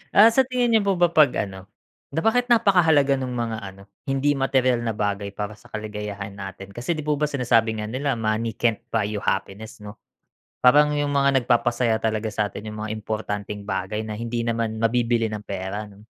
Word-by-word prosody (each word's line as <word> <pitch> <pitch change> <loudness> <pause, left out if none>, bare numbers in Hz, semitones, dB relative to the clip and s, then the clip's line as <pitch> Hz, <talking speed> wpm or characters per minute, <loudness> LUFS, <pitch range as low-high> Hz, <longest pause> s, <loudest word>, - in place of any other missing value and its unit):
Ah 220 +3 +8
sa 265 - +4
tingin 250 -2 +1
nyo 220 - +5
po 195 - +4
ba 175 -1 +3
'pag 155 -5 +5
ano, 95 0 -11 0.4
na 155 - -2
bakit 245 +2 +2
napakahalaga 165 - +4
nung 125 -1 -4
mga 115 -2 -2
ano, 100 -1 -10 0.2
hindi 135 +2 +1
materyal 130 -3 +2
na 115 -2 -2
bagay 100 -1 -2
para 105 0 -4
sa - - -18
kaligayahan 105 -2 -5
natin? 100 0 -8
Kasi 125 +10 -3
di 155 - -5
po 150 -1 0
ba 150 - +2
sinasabi 115 -5 +1
nga 105 - -3
nila 135 0 -1
money 110 0 -1
can't 115 -2 +1
buy 110 -2 +1
you 105 0 -3
happiness, 105 +2 -3
'no? 105 +1 -10 0.6
Parang 150 +4 +6
'yung 145 0 0
mga 140 -1 +3
nagpapasaya 120 -1 +2
talaga 110 0 0
sa 105 -1 -2
atin 105 +2 -8
'yung 105 - -8
mga 110 - -4
importanteng 105 -1 -4
bagay 95 +2 -2
na 110 -1 -5
hindi 115 0 -2
naman 115 -1 -1
mabibili 115 -1 +1
ng 105 -1 -5
pera, 100 +2 -4
'no? 100 +1 -17
115 Hz, 195 wpm, -23 LUFS, 105-140 Hz, 0.6 s, Ah